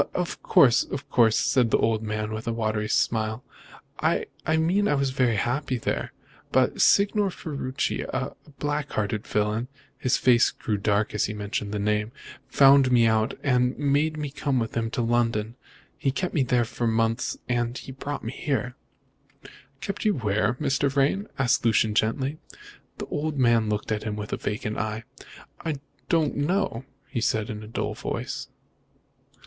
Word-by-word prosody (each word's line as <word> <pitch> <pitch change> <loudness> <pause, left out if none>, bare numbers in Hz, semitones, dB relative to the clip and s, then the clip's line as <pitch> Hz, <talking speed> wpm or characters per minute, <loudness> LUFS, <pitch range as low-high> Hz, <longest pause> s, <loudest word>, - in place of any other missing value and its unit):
"Of 180 -1 -2
course, 125 -4 +5
of 140 +1 -6
course," 110 -2 +4
said 125 -3 +2
the - - +4
old 110 -1 +1
man, 110 0 -3
with 110 +1 -5
a - - +1
watery 110 -1 -1
smile, 110 +1 0 0.6
"I - - +1 0.3
mean 185 +6 +2
I 145 - +2
was 135 -1 0
very 125 -3 +2
happy 130 +5 -1
there. - - -2 0.4
But - - +2
Signor 200 0 +4
Ferruci, 140 -6 -3
a - - -3 0.2
black 145 0 -2
hearted 105 0 -2
villain" 105 +3 0 0.3
his 130 - +2
face 120 -1 +4
grew 105 -4 -3
dark 100 +1 0
as 105 - +1
he 105 - -4
mentioned 105 0 -3
the 105 - -2
name 105 +1 0 0.4
"found 135 -1 +6
me 120 -2 +5
out 110 +2 +2
and 125 -2 +2
made 145 +2 +1
me 150 -2 -4
come 140 -2 -1
with 115 -2 -2
him 115 -1 0
to 120 - -1
London. 115 -1 0 0.4
He 135 - +1
kept 180 +7 -2
me 150 - +2
there 125 -2 +2
for 120 +1 -2
months, 115 0 0
and 120 -1 0
then - - -6
he - - -9
brought 140 +2 -5
me 115 - -4
here." 130 -3 -2 1.1
"Kept 200 - -4
you 210 -1 +2
where, 110 -1 0
Mr. 140 0 +1
Vrain?" 140 +10 +1
asked 130 0 +2
Lucian 110 -2 +3
gently. 130 +8 0 0.6
The - - -5
old 150 0 -2
man 115 -4 +3
looked 105 +1 -2
at 105 -1 0
him 105 -1 -3
with 105 0 -5
a - - 0
vacant 105 +1 -3
eye. 110 +1 -3 0.6
"I 160 -3 -1 0.3
don't 160 -4 +2
know," 145 - 0 0.2
he 120 - -3
said 110 0 0
in 105 0 -6
a 105 - -9
dull 105 -1 -3
voice. - - -4
120 Hz, 175 wpm, -26 LUFS, 110-140 Hz, 1.1 s, found